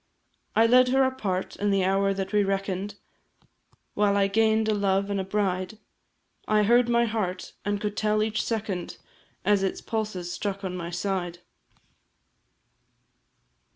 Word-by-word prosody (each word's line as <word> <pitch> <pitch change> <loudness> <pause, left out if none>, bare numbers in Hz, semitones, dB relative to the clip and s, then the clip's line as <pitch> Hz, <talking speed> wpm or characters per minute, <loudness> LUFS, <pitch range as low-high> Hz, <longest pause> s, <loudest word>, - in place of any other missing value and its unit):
I 225 - +5
led 250 +2 +6
her 265 +1 +3
apart, 210 -8 -2
and 205 0 0
the 195 -1 +2
hour 195 +1 +2
that 195 +1 -3
we 210 -1 +4
reckon'd, 195 0 -2 1.0
While 205 -1 +2
I 200 - +4
gain'd 220 +2 +2
a 215 - +2
love 200 -1 +1
and 200 - 0
a - - -1
bride, 190 0 -2 0.7
I 215 0 +3
heard 240 +3 +4
my 235 0 +3
heart, 205 -5 -3
and 205 0 -1
could 210 0 -3
tell 215 0 +1
each 215 0 -1
second, 210 -6 -3 0.5
As 205 0 +3
its 195 - -1
pulses 210 -6 -3
struck 200 0 -4
on 185 -1 -3
my 170 -1 -5
side. 175 -1 -3
200 Hz, 150 wpm, -26 LUFS, 190-215 Hz, 1.0 s, led